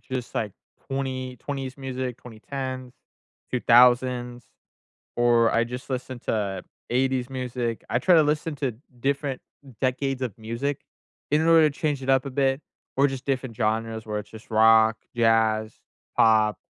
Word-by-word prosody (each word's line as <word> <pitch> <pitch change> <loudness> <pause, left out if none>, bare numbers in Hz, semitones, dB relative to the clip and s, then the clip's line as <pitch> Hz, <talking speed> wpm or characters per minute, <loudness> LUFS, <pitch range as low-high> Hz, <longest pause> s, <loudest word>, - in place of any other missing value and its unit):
just, 130 -2 -6
like, 105 -3 -2 0.4
2020s 130 0 -4
music, 130 -2 -4
2010s, 130 +2 -7 0.6
2000s 125 0 +3 0.7
or 120 -1 +4
I 115 - +3
just 125 +3 -7
listen 130 -1 -4
to 100 -4 -2 0.3
'80s 130 0 0
music. 125 -3 -3
I - - +1
try 180 +3 +5
to 155 - +6
listen 150 +1 -1
to 135 -4 -1 0.3
different 140 0 -1 0.4
decades 130 +1 0
of 120 -4 -3
music 115 +6 -3 0.5
in 155 +2 +3
order 160 -2 +6
to 140 - -9
change 145 -4 -1
it 135 - -4
up 135 0 +3
a 140 - -3
bit 135 0 +1 0.4
or 140 - +5
just 135 -2 -5
different 130 -4 -2
genres 110 0 -1
where 105 -1 -3
it's 105 - -10
just 110 +3 -13
rock, 110 0 +5 0.2
jazz, 110 -1 +2 0.5
pop, 110 -1 +4
125 Hz, 145 wpm, -25 LUFS, 115-135 Hz, 0.7 s, to